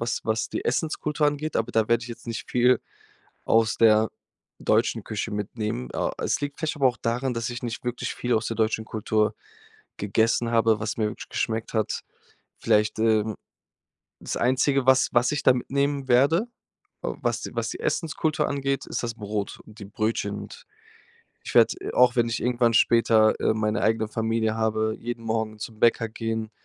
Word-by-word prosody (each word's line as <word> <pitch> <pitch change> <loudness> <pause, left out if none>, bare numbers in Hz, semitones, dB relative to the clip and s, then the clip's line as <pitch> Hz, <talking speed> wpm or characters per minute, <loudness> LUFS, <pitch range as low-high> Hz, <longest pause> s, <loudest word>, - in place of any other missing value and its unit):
was 115 0 -1
was 110 0 0
die - - -4
Essenskultur 150 +2 0
angeht, 145 +1 -2
aber 115 - -1
da 110 -1 +2
werde 115 0 +2
ich 115 - -8
jetzt 120 - -10
nicht 115 -1 -5
viel 125 +1 +4 0.6
aus 115 0 +3
der 110 -1 +5 0.5
deutschen - - +1
Küche 110 +1 -4
mitnehmen. 105 - -3
Oh, - - 0
es - - -1
liegt 145 0 -4
vielleicht 160 -1 -2
aber 140 -2 +3
auch 125 -1 -4
daran, 125 +3 -1
dass 115 0 -2
ich 120 +1 -6
nicht 120 -1 -4
wirklich 125 0 -3
viel 120 0 -1
aus 110 0 0
der 115 - -3
deutschen 110 0 0
Kultur 110 0 0 0.6
gegessen 115 +3 +1
habe, 115 -2 +3
was 105 -1 -3
mir 110 - +1
wirklich 105 - -8
geschmeckt 110 0 -2
hat. 110 -2 0 0.6
Vielleicht, 105 -1 +2
ähm, 110 -1 +2 0.8
das - - -4
Einzige, 130 +2 +2
was 130 0 +5
was 120 +2 +3
ich 150 - -2
da - - +6
mitnehmen 140 +2 -1
werde, 140 - +4 0.6
was - - -2
die - - -6
was - - -1
die - - -6
Essenskultur 155 -2 0
angeht, 140 -1 -1
ist - - -3
das 115 -1 -3
Brot 105 -2 -4
und 110 +1 -15
die 100 - -8
Brötchen. 105 0 -2
Und - - -12 0.8
ich - - -7
werde, - - +6
äh, - - -5
auch 125 -1 +5
wenn 120 -1 +3
ich 115 - -2
irgendwann 120 -2 +2
später, 115 -2 +5
äh, - - +2
meine 110 +1 0
eigene 110 0 +2
Familie 110 0 0
habe, 110 0 0
jeden 115 -1 -5
Morgen 110 -1 -2
zum 110 0 -7
Bäcker 115 -1 +3
gehen 110 -1 -3
115 Hz, 180 wpm, -25 LUFS, 110-125 Hz, 0.8 s, da